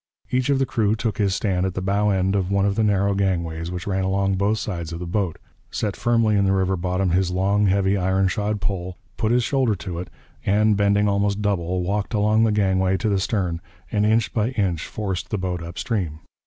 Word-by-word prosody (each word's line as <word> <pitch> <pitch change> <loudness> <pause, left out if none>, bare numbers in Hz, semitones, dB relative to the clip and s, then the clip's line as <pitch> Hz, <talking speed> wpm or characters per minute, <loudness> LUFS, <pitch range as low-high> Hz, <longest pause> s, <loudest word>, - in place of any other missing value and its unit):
Each 130 +1 +1
of 140 - +3
the 135 - +2
crew 110 -4 +1
took 110 -1 -3
his 100 -2 +2
stand 95 -3 0
at 95 -1 -2
the - - -1
bow 100 +2 +1
end 95 0 +1
of 95 -2 0
one 100 0 +2
of 100 - +2
the 110 - +1
narrow 100 -1 +2
gangways 85 -4 -1
which 90 -1 -5
ran 95 -1 -1
along 95 +1 +1
both 100 +3 +1
sides 85 -7 -4
of 85 - -4
the 90 - -5
boat, 90 -1 -1 0.3
set 105 -3 -2
firmly 115 -2 +2
in 100 - +3
the 95 0 +2
river 95 0 +1
bottom 90 +1 -1
his 90 +1 +2
long, 100 +3 +2
heavy, 95 +1 +2
iron 95 0 +1
shod 105 +2 -1
pole, 95 -3 -3 0.2
put 110 -1 0
his 120 0 +3
shoulder 130 -4 +1
to 90 -2 -6
it, 90 - -6 0.3
and, 105 +2 +3
bending 100 +1 +2
almost 100 +1 0
double, 90 -3 0
walked 100 +4 -1
along 105 +2 +3
the 110 - +2
gangway 95 -2 +2
to 110 - -1
the 100 -2 +1
stern 90 -4 -1 0.3
and 105 -1 +1
inch 110 +1 +2
by 110 -1 +1
inch 95 -9 -1
forced 95 -4 -4
the 105 - -1
boat 90 -2 -3
up 85 +1 -8
stream. 90 -8 -2
100 Hz, 225 wpm, -23 LUFS, 95-105 Hz, 0.3 s, of